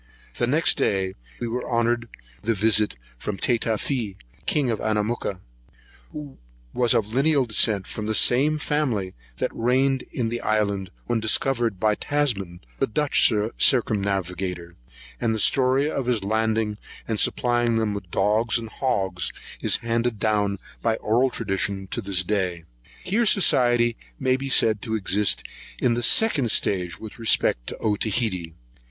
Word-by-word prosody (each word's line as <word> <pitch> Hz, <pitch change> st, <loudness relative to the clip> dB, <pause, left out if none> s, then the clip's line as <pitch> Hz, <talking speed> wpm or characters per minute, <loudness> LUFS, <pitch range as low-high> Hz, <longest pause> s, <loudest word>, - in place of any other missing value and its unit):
Next 140 Hz, +7 st, +2 dB
day 95 Hz, -1 st, 0 dB, 0.3 s
we 120 Hz, -, -3 dB
were 125 Hz, +2 st, -3 dB
honoured 120 Hz, 0 st, 0 dB, 0.3 s
with 110 Hz, -, -6 dB
a -, -, +4 dB
visit 105 Hz, -, +3 dB, 0.2 s
from 105 Hz, -, -4 dB
Tatafee, 115 Hz, -1 st, -1 dB, 0.3 s
king 140 Hz, -5 st, +1 dB
of 110 Hz, -, -2 dB
Anamooka, 105 Hz, -3 st, -2 dB, 0.7 s
who 150 Hz, -2 st, -9 dB, 0.3 s
was 120 Hz, -2 st, +3 dB
of 110 Hz, 0 st, 0 dB
lineal 140 Hz, +1 st, +3 dB
descent 105 Hz, -3 st, +3 dB
from 110 Hz, -1 st, -6 dB
the 110 Hz, -, 0 dB
same 145 Hz, +8 st, +3 dB
family 130 Hz, -11 st, -1 dB, 0.2 s
that -, -, -1 dB
reigned 130 Hz, +3 st, +1 dB
in 115 Hz, -3 st, -2 dB
the 120 Hz, +1 st, -3 dB
island 100 Hz, -3 st, 0 dB, 0.2 s
when 120 Hz, -1 st, 0 dB
discovered 115 Hz, -1 st, +1 dB
by 105 Hz, +1 st, +2 dB
Tasman, 105 Hz, -10 st, -1 dB, 0.2 s
the -, -, +1 dB
Dutch 145 Hz, +2 st, +3 dB, 0.3 s
circumnavigator; 95 Hz, -6 st, +1 dB, 0.4 s
and 115 Hz, -2 st, 0 dB
the -, -, -3 dB
story 130 Hz, +5 st, +3 dB
of 140 Hz, -5 st, -3 dB
his 120 Hz, -5 st, 0 dB
landing 110 Hz, 0 st, 0 dB, 0.3 s
and 110 Hz, -2 st, -1 dB
supplying 120 Hz, -1 st, +1 dB
them 110 Hz, -2 st, 0 dB
with 100 Hz, -3 st, -7 dB
dogs 105 Hz, +6 st, +1 dB
and 115 Hz, -1 st, -6 dB
hogs, 95 Hz, -9 st, -2 dB, 0.3 s
is -, -, +3 dB
handed 115 Hz, 0 st, 0 dB
down, 105 Hz, -2 st, 0 dB, 0.2 s
by 115 Hz, -1 st, +1 dB
oral 120 Hz, +5 st, +1 dB
tradition, 95 Hz, -3 st, -3 dB
to 120 Hz, -, -2 dB
this 95 Hz, -2 st, +1 dB
day.[133 90 Hz, -4 st, -2 dB, 0.4 s
1] 185 Hz, -, -8 dB
Here 230 Hz, +4 st, +3 dB
society 120 Hz, -, +3 dB, 0.2 s
may 130 Hz, 0 st, +2 dB
be 135 Hz, +1 st, -4 dB
said 110 Hz, -5 st, +3 dB
to 110 Hz, -2 st, -3 dB
exist 105 Hz, 0 st, +1 dB, 0.3 s
in 125 Hz, -, +1 dB
the 120 Hz, -, -1 dB
second 140 Hz, -, +3 dB
stage 90 Hz, -4 st, 0 dB
with 110 Hz, +1 st, -10 dB
respect 85 Hz, -, +2 dB
to -, -, -6 dB
Otaheite. 105 Hz, -5 st, -1 dB
110 Hz, 150 wpm, -24 LUFS, 100-125 Hz, 0.7 s, a